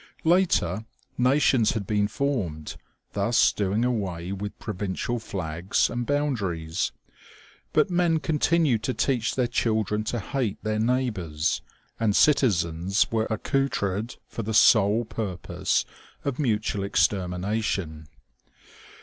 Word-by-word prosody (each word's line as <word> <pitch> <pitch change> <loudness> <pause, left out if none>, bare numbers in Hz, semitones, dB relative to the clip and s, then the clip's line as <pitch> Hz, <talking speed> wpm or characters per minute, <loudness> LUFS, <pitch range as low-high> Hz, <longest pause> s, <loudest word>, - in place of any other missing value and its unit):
Later, 160 - +2 0.3
nations 125 -2 +3
had 110 -3 -3
been 105 0 +1
formed, 105 - -2 0.4
thus - - +3
doing 105 +3 0
away 95 -7 -2
with 100 +1 -5
provincial 105 +3 -3
flags 90 -3 -1
and 120 0 -3
boun 145 0 +1
daries; 85 -4 -2 0.8
but - - +2
men 175 -2 +2
continued 155 -4 +2
to 130 +3 -2
teach 125 -5 0
their 125 - +2
children 110 -3 0
to 120 - -2
hate 115 -1 -2
their 110 0 -1
neighbors, 105 -11 0 0.4
and 105 -3 +2
citizens 95 - +2
were 110 -1 +1
accoutred 110 -3 -1
for - - -5
the 110 0 -3
sole 110 +1 +5
purpose 100 -5 -2 0.4
of 140 -1 -2
mutual 105 -6 0
extermination. 95 -4 -1
110 Hz, 115 wpm, -26 LUFS, 95-125 Hz, 0.8 s, sole